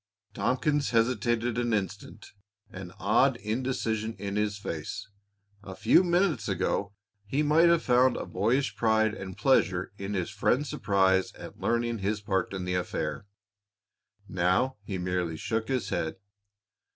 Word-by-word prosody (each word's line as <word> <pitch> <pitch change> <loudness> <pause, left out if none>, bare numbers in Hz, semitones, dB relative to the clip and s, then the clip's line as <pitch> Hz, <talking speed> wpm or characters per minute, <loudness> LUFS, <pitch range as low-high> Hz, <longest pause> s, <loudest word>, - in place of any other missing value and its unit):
Tompkins 145 +3 0
hesitated 120 0 +1
an 120 -2 +1
instant, 100 0 -5 0.4
an 95 -1 -8
odd 120 +6 +3
indecision 115 -1 -2
in 100 0 -4
his 105 0 0
face. 85 -6 -5 0.5
A 95 -2 -9
few 185 - +4
minutes 175 - +1
ago 95 +1 -1 0.3
he 135 +9 -1
might 160 +3 +5
have 170 -1 +3
found 125 +1 +4
a - - -4
boyish 115 +8 0
pride 110 -1 +2
and 95 -3 -7
pleasure 95 -6 +2
in 100 +1 -4
his 95 +3 -2
friend's 125 +7 0
surprise 95 -2 +2
at - - -11
learning 120 -1 0
his 100 +2 -1
part 100 -2 -1
in 95 -2 -4
the 90 - -2
affair. 90 +2 -3 1.0
Now 95 +9 +1
he 100 -2 -4
merely 90 -2 -2
shook 110 +5 -2
his 130 -3 -1
head. 80 - -2
110 Hz, 140 wpm, -28 LUFS, 95-125 Hz, 1.0 s, might